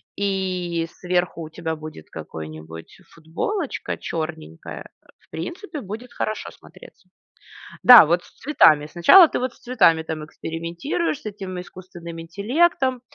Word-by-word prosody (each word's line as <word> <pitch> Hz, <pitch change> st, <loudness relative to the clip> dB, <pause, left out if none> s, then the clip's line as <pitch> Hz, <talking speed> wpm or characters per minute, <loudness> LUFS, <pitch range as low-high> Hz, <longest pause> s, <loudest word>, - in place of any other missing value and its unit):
и 185 Hz, -4 st, -2 dB
сверху 180 Hz, -2 st, -1 dB
у 155 Hz, -, -8 dB
тебя 160 Hz, 0 st, -4 dB
будет 155 Hz, -, -11 dB
какой-нибудь 80 Hz, +1 st, -9 dB, 0.2 s
футболочка 245 Hz, -, -4 dB
черненькая. 155 Hz, -, -6 dB, 0.2 s
Э, -, -, -26 dB
в -, -, -31 dB
принципе 305 Hz, -, -6 dB
будет 220 Hz, +5 st, -8 dB
хорошо 215 Hz, -, -3 dB
смотреться. -, -, -17 dB, 0.7 s
Да, 245 Hz, -7 st, +11 dB
вот 170 Hz, +3 st, +1 dB
с -, -, -20 dB
цветами. 155 Hz, -, +4 dB
Сначала 300 Hz, -, +7 dB
ты -, -, -2 dB
вот 255 Hz, -1 st, -3 dB
с -, -, -23 dB
цветами, 180 Hz, -10 st, +3 dB
там, 155 Hz, -1 st, -5 dB
экспериментируешь, 170 Hz, -, -4 dB
с -, -, -25 dB
этим 195 Hz, -3 st, -6 dB
искусственным 175 Hz, -2 st, -10 dB
интеллектом. 255 Hz, -, 0 dB
175 Hz, 130 wpm, -22 LUFS, 160-240 Hz, 0.7 s, Да